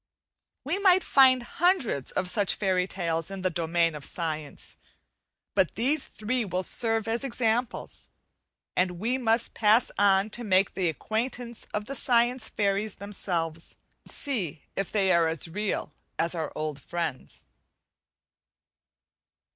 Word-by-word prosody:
We 325 +8 -1
might 375 -2 +5
find 255 -2 +5
hundreds 275 - +1
of 185 - -2
such 200 +1 +1
fairy 185 -2 +1
tales 165 -3 -2
in 195 -1 -6
the 185 - +1
domain 165 0 +1
of 150 -2 -8
science, 155 -3 -5 0.8
but 185 - +2
these 270 +7 +2
three 240 +3 -2
will 185 -2 -2
serve 225 +1 +1
as 230 +3 0
examples, 240 -2 -1 0.7
and 180 -1 +1
we 245 +6 0
much 230 -1 +2
pass 220 +2 +4
on 200 +1 +4
to 240 - -5
make 190 -2 +2
the 180 -3 +1
acquaintance 235 - -3
of 210 0 -3
the 270 - -5
science 240 -2 +2
fairies 200 0 0
themselves, 170 -5 -4 0.3
and - - -4
see 200 - -2
if 195 -1 -2
they 195 -3 +2
are 170 -2 +4
as 160 0 -2
real 205 +4 -3 0.2
as 170 +2 +1
our 160 -3 -3
old 155 -2 -4
friends. 170 -6 -5
200 Hz, 140 wpm, -27 LUFS, 170-235 Hz, 0.8 s, might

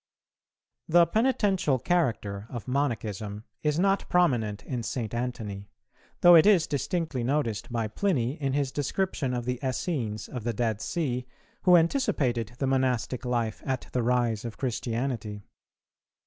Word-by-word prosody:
The 170 +1 +6
penitential 195 - +2
character 115 - -1
of 120 -1 -7
Monachism 110 -6 -2 0.2
is 150 0 +1
not 195 +2 +1
prominent 120 -13 +1
in 125 -3 -3
St. 115 -1 -4
Antony, 115 -5 -4 0.5
though 175 0 +9
it 165 +2 +8
is 185 -6 +5
distinctly 150 -3 -2
noticed 125 -4 -1
by 115 -2 -1
Pliny 130 - 0
in 135 -1 0
his 140 -2 0
description 145 -1 -1
of 120 -1 -3
the 125 -1 -2
Essenes 130 -5 -2
of 125 -4 -6
the 120 +1 -1
Dead 110 -2 -1
Sea, 125 -7 -2 0.4
who 180 -1 +8
anticipated 130 - +1
the 135 - -1
monastic 130 -2 0
life 120 -3 -1
at 130 -2 -3
the 125 - 0
rise 120 -2 +1
of 115 -2 -6
Christianity. 115 -4 -3
125 Hz, 140 wpm, -27 LUFS, 115-150 Hz, 0.5 s, though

